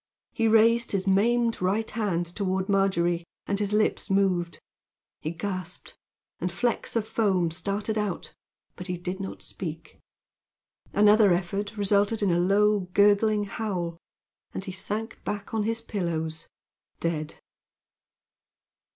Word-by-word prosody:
He 225 -1 +1
raised 230 +1 +4
his 195 -1 0
maimed 230 +4 +2
right 200 +5 0
hand 200 -6 0
toward 190 +1 -2
Margery, 175 -4 +2 0.2
and 200 0 -1
his 205 -1 0
lips 215 +1 +1
moved. 185 -3 +1 0.6
He 155 - -3
gasped, 180 0 -5 0.4
and 180 - -2
flecks 240 +6 -1
of 220 -2 0
foam 190 -8 +1
started 200 +5 -2
out, 205 -4 -3 0.4
but 180 - -8
he 180 -1 -2
did 180 +2 -4
not 195 -1 -6
speak. 165 -3 -7 0.9
Another 210 -1 +6
effort 195 +5 -1
resulted 205 +2 +2
in 195 - +3
a 170 - +2
low 200 +1 +3
gurgling 205 +1 +4
howl, 185 -5 -3 0.6
and - - -3
he 190 - -5
sank 210 +4 -5
back 205 +1 -4
on 215 -2 0
his 225 +1 0
pillows 165 -7 -3 0.5
dead. 155 -2 -2
200 Hz, 130 wpm, -27 LUFS, 180-210 Hz, 0.9 s, Another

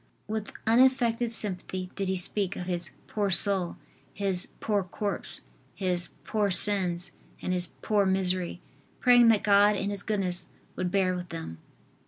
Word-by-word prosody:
With 215 -1 -4
unaffected 240 -1 +3
sympathy 185 -3 -3
did 195 - -2
he 190 - 0
speak 195 +1 +1
of 180 - -5
his 175 -2 -2 0.2
"poor 205 -2 -1
soul," 190 -1 +2 0.3
his 190 -3 -1
"poor 205 -3 0
corpse" 200 +2 -3 0.3
his 180 -2 -1
"poor 210 -2 0
sins" 185 -2 +3 0.3
and 185 - -2
his 180 -1 0 0.2
"poor 205 -3 +2
misery," 185 -2 0 0.4
praying 245 -2 +6
that 225 -3 +4
God 205 0 +5
in 200 +1 -2
His 200 -1 -2
goodness 195 -4 -1 0.3
would 185 -1 -2
bear 185 -1 +1
with 180 -1 -5
them. 160 - -7
195 Hz, 150 wpm, -28 LUFS, 180-210 Hz, 0.4 s, praying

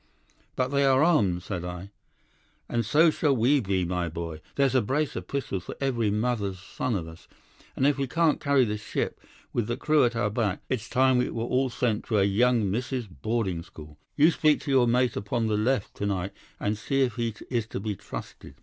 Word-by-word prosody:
"'"But 130 0 0
they 140 0 +2
are 135 +1 +4
armed," 100 - +2
said 90 -3 -4
I. 90 +2 -7 0.8
"'"And 120 -1 0
so 155 +9 +4
shall 145 -2 +1
we 130 +5 +3
be, 95 -5 0
my 90 -1 -1
boy. 80 -1 -6
There's 135 -2 +2
a 130 - +4
brace 140 +7 -1
of - - -5
pistols 100 -10 -3
for - - -7
every 120 -6 0
mother's 105 -3 -1
son 105 +5 -3
of 85 -4 -3
us, 80 +1 -13 0.5
and 130 - +1
if 145 -1 +2
we 135 - 0
can't 165 +3 +2
carry 140 -3 +3
this 105 -1 -3
ship, 110 - -3 0.3
with 120 -3 0
the 120 +1 -2
crew 150 +2 +3
at 120 -1 +1
our 105 -3 0
back, 105 -3 -1
it's 125 -2 -2
time 130 0 +3
we 125 - 0
were 115 - -3
all 130 +2 +1
sent 115 -3 -1
to 110 - 0
a 100 - +4
young 110 +1 +2
misses' 125 +3 -2
boarding 95 - -2
school. 75 -3 -13 0.2
You 155 +3 +5
speak 155 -2 +2
to 145 - -3
your 130 -3 +4
mate 125 +1 +2
upon 115 +3 -1
the 110 -1 +1
left 110 +1 0
to 100 - -1
night, 95 -1 -2 0.3
and 105 +1 -1
see 135 +5 +1
if 125 -2 -2
he 115 -2 -1 0.2
is 115 -3 0
to - - -5
be 105 0 -3
trusted." - - -9
115 Hz, 215 wpm, -27 LUFS, 100-130 Hz, 0.8 s, You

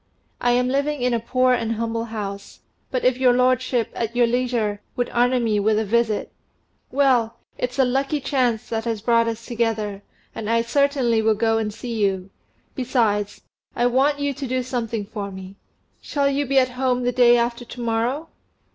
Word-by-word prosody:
I 245 0 +2
am 250 +1 +2
living 280 +1 0
in 250 -1 +2
a 235 - +1
poor 255 +2 +2
and 230 -2 0
humble 230 0 -2
house; 205 -3 -7 0.3
but 255 -2 -2
if 255 0 +3
your 255 -2 +5
lordship, 250 -2 +1
at 230 0 -3
your 245 0 +4
leisure, 235 -4 -1
would 245 -1 -2
honour 245 +1 +2
me 220 -3 +1
with 215 +1 +2
a 220 - 0
visit 225 0 0 0.3
" - - -44
"Well, 250 -4 +2 0.2
it's 250 +2 -3
a 265 - +4
lucky 270 +4 0
chance 250 -5 0
that 225 0 -2
has 225 -3 -3
brought 230 -1 +3
us 230 0 -4
together, 220 -4 -2 0.3
and 220 -1 -5
I 230 0 +2
certainly 265 -3 +2
will 220 0 +3
go 225 +1 +1
and 215 -1 -2
see 235 +3 -6
you; 190 -1 -1 0.4
besides, 225 -6 0 0.3
I 240 - +1
want 270 +4 +3
you 285 0 -1
to 275 0 -5
do 255 0 -1
something 235 -4 -3
for 205 -1 -5
me. 190 0 -10 0.4
Shall 280 -1 0
you 280 0 -1
be 275 +1 +1
at 255 -1 +4
home 250 0 0
the 245 - +1
day 240 -1 +5
after 235 +1 -1
to 245 - -11
morrow?" 240 +6 -1
240 Hz, 190 wpm, -22 LUFS, 225-255 Hz, 0.4 s, your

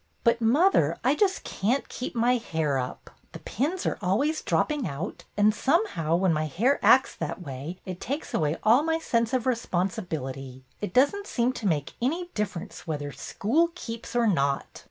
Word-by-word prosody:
"But, 235 0 +3
mother, 230 - +4
I 260 +3 +4
just 385 +4 +1
can't 235 +8 -1
keep 250 - -6
my 240 +2 +3
hair 160 - -1
up. 125 0 -6 0.2
The - - -7
pins 310 - -2
are - - -1
always 255 - +1
drop - - +1
ping 295 -8 -1
out; 155 +6 -5
and, 210 +1 +5
somehow, 215 - +1
when 180 -1 +2
my 155 0 0
hair 230 - +1
acts 265 - +5
that 180 - -4
way 145 +5 -6
it 185 -1 -6
takes 285 +4 -4
away 155 +1 +1
all 230 +5 +6
my 320 +1 +1
sense 235 -7 0
of 255 -3 +1
respon 225 -7 0
sibility. 135 - -6 0.2
It 205 - -3
does 275 +9 +5
n't 405 0 -7
seem 245 +1 +1
to 225 -5 -3
make 150 -5 -1
any 340 +8 -1
differ 200 -5 -2
ence - - -11
whether 145 -2 -3
school 300 - 0
keeps 230 -8 -7
or 240 -1 +3
not!" 140 -9 0
220 Hz, 190 wpm, -27 LUFS, 160-265 Hz, 0.2 s, all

